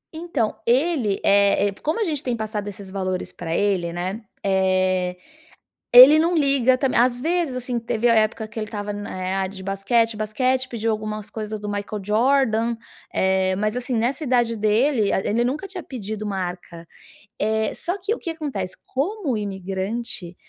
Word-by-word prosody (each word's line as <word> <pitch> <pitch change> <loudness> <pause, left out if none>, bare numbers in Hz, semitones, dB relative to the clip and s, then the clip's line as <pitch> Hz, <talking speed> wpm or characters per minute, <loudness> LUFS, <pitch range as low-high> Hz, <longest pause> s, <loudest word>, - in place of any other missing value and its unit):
Então 315 -9 -1
ele 255 - +2
eh, 200 0 +4
como 310 +9 -1
a - - +2
gente 305 -6 -1
tem 245 -2 -1
passado 215 -1 -4
esses 195 -1 -8
valores 185 -2 -3
para 165 -1 -3
ele, 185 -4 +1
né, 185 +5 -4 0.2
eh, 185 -1 +1 0.8
ele 260 +5 +11
não 335 +2 +2
liga 275 -4 +3
também 255 -2 +1
às 245 0 +2
vezes, 330 -4 0
assim, 250 -1 -3
teve 230 0 0
a 230 - +5
época 220 0 +1
que 215 - -14
ele 215 - -2
estava 205 -1 -5
na 205 0 -6 0.3
EA - - -1
de 190 0 -9
basquete, 210 +4 +1
basquete, 255 +5 0
pediu 225 -2 -2
algumas 215 -1 -4
coisas 215 -1 -5
do 210 - -5
Michael 205 0 -4
Jordan, 230 +1 +2 0.4
eh. 190 0 +2
Mas 215 +2 -1
assim, 250 0 -3
nessa 245 +7 0
idade 240 -3 +2
dele, 215 +2 +2
ele 235 +3 +1
nunca 290 +10 -2
tinha 370 -2 -6
pedido 215 -5 -6
marca, 180 -4 -5 0.5
eh, 220 +1 0
só 355 - -3
que 405 +5 -1
o - - -11
que 335 - -4
acontece, 270 - -4
como 295 - -1
imigrante, 195 -1 -4
220 Hz, 165 wpm, -23 LUFS, 200-255 Hz, 0.8 s, ele